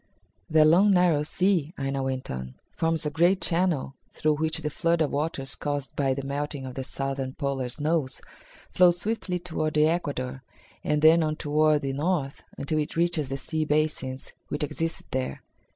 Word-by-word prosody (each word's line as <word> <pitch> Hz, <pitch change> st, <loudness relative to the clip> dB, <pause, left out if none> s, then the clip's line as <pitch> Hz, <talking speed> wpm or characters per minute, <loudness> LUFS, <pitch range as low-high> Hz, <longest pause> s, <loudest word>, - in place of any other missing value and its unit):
"That 155 Hz, -1 st, +6 dB
long 180 Hz, +7 st, +6 dB
narrow 180 Hz, -6 st, +4 dB
sea," 170 Hz, 0 st, 0 dB
Aina 135 Hz, 0 st, -2 dB
went 130 Hz, -1 st, -3 dB
on, 65 Hz, 0 st, -6 dB, 0.2 s
"forms 165 Hz, -1 st, 0 dB
a 150 Hz, -, -1 dB
great 175 Hz, +4 st, +3 dB
channel 165 Hz, -6 st, 0 dB, 0.2 s
through 155 Hz, -1 st, 0 dB
which 160 Hz, +1 st, 0 dB
the 150 Hz, -, -2 dB
flood 170 Hz, +2 st, +1 dB
of 155 Hz, -3 st, +1 dB
waters 140 Hz, -2 st, -2 dB
caused 145 Hz, -2 st, -4 dB
by 135 Hz, -2 st, +1 dB
the 135 Hz, 0 st, -5 dB
melting 145 Hz, 0 st, -3 dB
of 130 Hz, -, -6 dB
the 130 Hz, -, -4 dB
southern 135 Hz, 0 st, -3 dB
polar 135 Hz, -3 st, -2 dB
snows 150 Hz, 0 st, -1 dB, 0.5 s
flows 175 Hz, -1 st, +5 dB
swiftly 200 Hz, -2 st, -1 dB
toward 160 Hz, -3 st, -3 dB
the 150 Hz, 0 st, +5 dB
equator 140 Hz, -6 st, -1 dB, 0.4 s
and 150 Hz, 0 st, 0 dB
then 160 Hz, +2 st, +7 dB
on 155 Hz, -1 st, 0 dB
toward 150 Hz, 0 st, +2 dB
the 135 Hz, -1 st, -1 dB
north 145 Hz, -1 st, -1 dB
until 155 Hz, +2 st, -1 dB
it 150 Hz, -, -3 dB
reaches 165 Hz, -4 st, +1 dB
the 135 Hz, -, -2 dB
sea 155 Hz, +3 st, -2 dB
basins 150 Hz, -3 st, -1 dB
which 145 Hz, -, -3 dB
exist 165 Hz, +3 st, -2 dB
there. 130 Hz, 0 st, -3 dB
150 Hz, 175 wpm, -26 LUFS, 135-165 Hz, 0.5 s, then